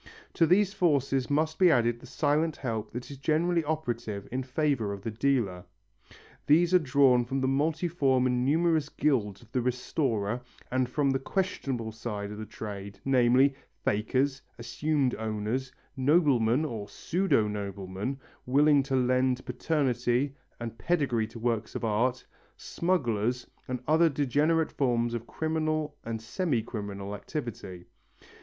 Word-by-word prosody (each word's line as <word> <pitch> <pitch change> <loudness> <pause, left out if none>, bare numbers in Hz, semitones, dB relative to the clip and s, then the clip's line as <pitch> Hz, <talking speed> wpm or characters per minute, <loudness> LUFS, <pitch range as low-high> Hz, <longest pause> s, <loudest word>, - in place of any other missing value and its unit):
To 165 - +3
these 195 +3 +3
forces 140 - +1
must 155 +2 0
be 185 -2 +7
added 120 -5 +2
the - - -13
silent 155 +2 +1
help 110 -5 -3
that 125 +3 -7
is 140 - -8
generally 165 +4 +1
operative 120 -10 -3
in 130 +2 -1
favour 130 -5 0
of 100 -1 -8
the 115 - -3
dealer. 110 -7 0 0.8
These 170 +4 +4
are 180 - +7
drawn 130 -4 +4
from 135 +3 -2
the 130 - +1
multiform 145 -2 +1
and 125 -1 +1
numerous 160 +1 +2
guilds 115 -11 0
of 115 - -21
the 125 - 0
restorer, 120 -3 -1 0.3
and 130 -1 +1
from 140 +1 +1
the 135 - 0
questionable 135 - -2
side 105 -2 -5
of 105 - -7
the 110 - -6
trade, 100 -2 -7
namely, 130 +1 +4 0.3
fakers, 130 +6 +1 0.2
assumed 130 +3 0
owners, 110 +4 -2 0.2
noblemen 135 -2 +3
or 110 -7 -5
pseudo 170 - +1
noblemen 100 +4 -4 0.3
willing 145 +2 +5
to 135 0 -2
lend 130 0 +1
paternity 125 -1 0 0.3
and 115 -2 -6
pedigree 135 -10 +1
to 115 - -11
works 115 -1 -2
of - - -2
art, 120 +4 0 0.3
smugglers 125 - -1 0.2
and 125 -1 -4
other 160 +2 +5
degenerate 150 +3 +1
forms 120 -3 0
of 120 0 -4
criminal 155 -1 -1
and 115 -1 -4
semi 120 - -1
criminal 100 -3 -5
activity. 105 - -6
130 Hz, 140 wpm, -28 LUFS, 115-150 Hz, 0.8 s, be